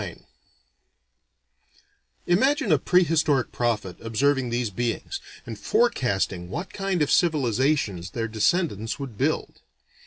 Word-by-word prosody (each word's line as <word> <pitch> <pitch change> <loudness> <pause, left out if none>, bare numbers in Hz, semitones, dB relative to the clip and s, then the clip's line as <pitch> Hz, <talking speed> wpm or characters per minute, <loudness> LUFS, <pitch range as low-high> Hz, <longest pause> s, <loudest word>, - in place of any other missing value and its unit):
IX - - -7 2.0
Imagine 265 - +2
a 155 - +5
prehistoric 155 -6 +2
prophet 105 -7 -1
observing 130 +3 +1
these 120 -2 -1
beings, 120 - -3 0.2
and - - -7
forecasting 100 - 0
what 170 - -5
kind 195 -5 0
of 145 - -1
civilizations 130 - +1
their 115 +2 -3
descendants 110 - 0
would 135 -5 -7
build. - - -2
130 Hz, 105 wpm, -25 LUFS, 110-170 Hz, 2.0 s, a